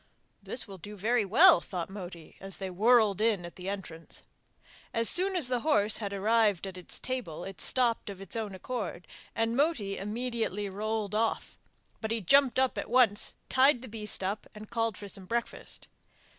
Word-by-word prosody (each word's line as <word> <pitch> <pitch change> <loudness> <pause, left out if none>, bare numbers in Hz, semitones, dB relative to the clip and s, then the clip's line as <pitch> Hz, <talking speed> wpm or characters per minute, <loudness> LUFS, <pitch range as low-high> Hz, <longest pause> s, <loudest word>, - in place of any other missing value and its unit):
'This 245 - -1
will 195 -2 -10
do 205 +5 -9
very 220 +4 +1
well,' 305 - +6
thought 180 -4 -5
Moti 180 -4 -9
as 195 -1 -6
they 190 -1 -5
whirled 215 +1 +4
in 215 -6 +1
at 170 - -10
the 185 +1 -6
entrance. 175 -5 -8 0.7
As 230 0 +5
soon 380 +2 +4
as 330 -8 +4
the 250 -1 0
horse 215 -7 +2
had 205 -3 -4
arrived 205 -1 +2
at 190 -1 -7
its 180 -1 -4
table 220 -12 -4
it 190 -4 -7
stopped 240 -4 +1
of 195 -2 -8
its 195 - -5
own 215 -4 -4
accord 195 -4 -5 0.3
and 225 +1 0
Moti 260 -9 0
immediately 220 -1 -3
rolled 210 +1 -3
off; 220 +1 -1 0.5
but 220 - -3
he 230 +1 0
jumped 260 +7 +4
up 260 -1 +1
at - - -5
once, 235 -4 +3
tied 260 -1 +4
the - - -8
beast 210 -3 -2
up, 200 +3 -3
and 215 +1 -11
called 230 -3 -1
for 205 - -8
some 195 -1 -8
breakfast. 235 +2 -3
215 Hz, 185 wpm, -29 LUFS, 195-235 Hz, 0.7 s, well